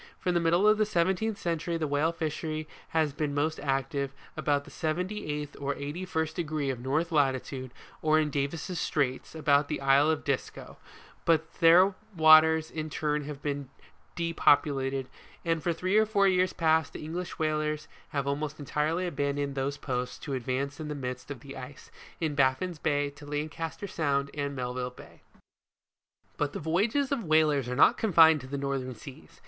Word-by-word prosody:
From 180 - -1
the 175 - +3
middle 170 +4 +3
of 215 0 +5
the 215 - +4
seventeenth 190 +3 +1
century 170 0 -2
the 160 - -1
whale 145 +3 +1
fishery 155 -1 -3 0.2
has 155 -3 +1
been 145 -1 -2
most 155 +2 0
active 140 0 -1 0.2
about 145 -1 0
the - - -14
78th 155 -3 -3
or 140 0 -1
81st 160 +2 -3
degree 155 -5 -2
of 125 - -6
north 150 +7 -1
latitude, 135 -3 0 0.3
or 155 0 +4
in 150 -1 0
Davis' 155 +6 -2
Straits, 135 0 -1
about 145 -2 +3
the 150 - -3
isle 135 +2 +4
of 160 -1 0
Disco; 140 -4 -3 0.5
but 160 -1 +3 0.2
these 180 +3 +7 0.3
waters 160 0 +6
in 155 -1 -4
turn 150 -1 -1
have 145 -1 -8
been 140 -2 -3 0.5
depopulated, 140 -5 +2 0.4
and 165 -1 +1
for 175 - 0
three 185 +4 -1
or 220 - +3
four 200 -2 +3
years 185 -1 +3
past, 160 -2 +2
the - - -7
English 175 +3 -5
whalers 155 -1 -1 0.2
have 140 -3 -2
almost 145 +2 -2
entirely 150 +5 -1
abandoned 140 -3 -1
those 135 +1 -2
places, 125 -3 -3
to 140 - -6
advance 135 +3 -2
in 155 - -5
the 150 - -4
midst 125 -1 -5
of 140 -5 -7
the 140 -1 -10
ice, 130 +1 -10 0.3
in 160 -3 -1
Baffins 145 +5 +1
Bay, 145 -2 +1
to 145 +1 -13
Lancaster 155 +4 -4
Sound 140 -6 -1
and 140 -1 -3
Melville 125 0 -3
Bay. 125 - -15 1.2
But 145 -1 -1
the - - -4
voyages 215 - +1
of 270 -5 0
whalers 155 -5 +3
are 125 - -2
not 140 - +5
confined 160 -7 +6
to 130 - -10
the 140 +1 -4
northern 135 -2 -3
seas. 115 - -13
150 Hz, 175 wpm, -29 LUFS, 140-165 Hz, 1.2 s, these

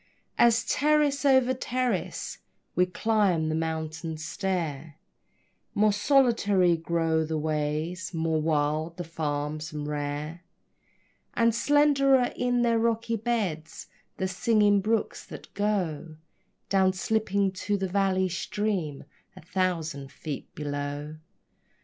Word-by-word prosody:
As, 230 -1 +5
terrace 295 0 +2
over 260 -2 +5
terrace, 255 0 -2 0.4
we 180 0 +3
climb 185 -5 +1
the - - 0
mountain 160 0 -3
stair, 160 -3 -3 0.8
More 210 0 +4
solitary 205 -7 +3
grow 165 -1 0
the 160 0 -2
ways, 155 +3 -2
more 160 -2 0
wild 155 +1 0
the 175 - -3
farms 155 -2 -3
and 150 -1 -5
rare, 150 +3 -4 0.9
And 230 -1 +3
slenderer 275 -1 +3
in 245 -1 +1
their 230 -1 +3
rocky 230 0 0
beds 205 -9 -3 0.3
the 190 - -1
singing 205 +1 +3
brooks 220 +2 -1
that - - -11
go 180 -7 -1 0.5
Down 190 -1 +3
slipping 200 0 0
to 200 +2 -2
the 190 -1 -2
valley 190 0 +1
stream 180 -4 -2 0.3
a - - -11
thousand 160 -6 -2
feet 150 -1 -6
below. 145 +1 -4
180 Hz, 115 wpm, -27 LUFS, 155-220 Hz, 0.9 s, As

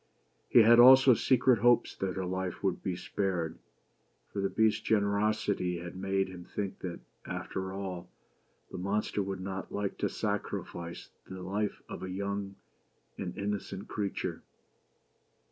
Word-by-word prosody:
He 120 - +7
had 115 +2 +7
also 130 +1 +9
secret 125 0 +3
hopes 120 +2 +4
that 95 -1 -2
her 95 -1 -2
life 95 0 -3
would 95 -3 0
be 95 -3 -2
spared; 90 -2 -2 0.7
for 100 - -1
the 95 - +1
Beast's 110 0 +2
generosity 100 -3 +1
had 90 +1 -7
made 95 +1 0
him 90 -1 -9
think 100 +2 -5
that, 90 -2 -6 0.3
after 95 0 -4
all, 95 -2 -5 0.6
the - - -6
monster 100 +2 -1
would 95 -1 -4
not 95 0 -5
like 100 -1 -3
to - - +1
sacrifice 85 0 -4 0.2
the 95 -1 -7
life 100 +3 -2
of - - -7
a 95 - -5
young 100 +1 -3 0.6
and 90 -2 -5
innocent 100 -1 -3
creature. 100 -2 -3
95 Hz, 145 wpm, -31 LUFS, 95-105 Hz, 0.7 s, also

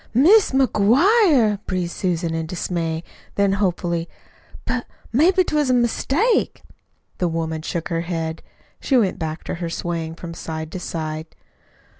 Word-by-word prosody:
"MIS' 370 - +6
MCGUIRE!" 265 - +4
breathed 180 -2 -1
Susan 170 -3 -1
in 165 0 -2
dismay; 165 -2 -2 0.3
then 200 -1 +3
hopefully, 175 -4 -1 0.6
"But 250 -1 -2 0.3
maybe 360 +9 +4
'twas 300 -5 0
a 255 - +4
mistake." 280 - +1 0.6
The 180 - +1
woman 160 -1 -2
shook 165 +1 -4
her 165 -1 -1
head. 165 -2 -3 0.4
She 270 - +2
went 200 -5 +1
back 160 -1 -4
to - - -4
her 170 - -2
swaying 165 -1 -3
from 170 -1 -8
side 160 -1 -6
to 185 - -5
side. 155 -2 -4
180 Hz, 140 wpm, -22 LUFS, 165-250 Hz, 0.6 s, MIS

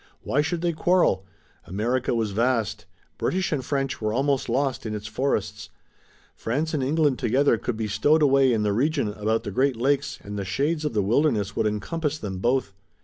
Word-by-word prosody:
Why 145 - +1
should 160 +3 -2
they 170 -1 0
quarrel? 160 - +2 0.4
America 120 +7 -1
was 110 -3 -1
vast. 115 0 0 0.3
British 185 0 0
and 145 -4 -1
French 135 -1 -2
were 110 0 0
almost 135 +2 0
lost 135 +2 0
in 110 - -3
its 105 0 -6
forests. 130 +6 -2 0.7
France 150 +8 -2
and 150 - 0
England 145 0 +1
together 130 +3 +3
could 120 - -3
be 110 -1 -2
stowed 150 +9 +3
away 135 -2 +4
in 110 -3 +1
the 105 -1 +1
region 140 +1 +1
about 105 +2 -1
the 100 - -5
Great 130 +5 +1
Lakes 140 +4 0
and 105 0 -5
the - - -2
shades 150 - -1
of 150 - -2
the 105 - +2
wilderness 110 -2 +1
would - - +1
encompass 150 +8 -2
them 95 -8 -5
both. 120 -1 0
130 Hz, 190 wpm, -25 LUFS, 110-145 Hz, 0.7 s, away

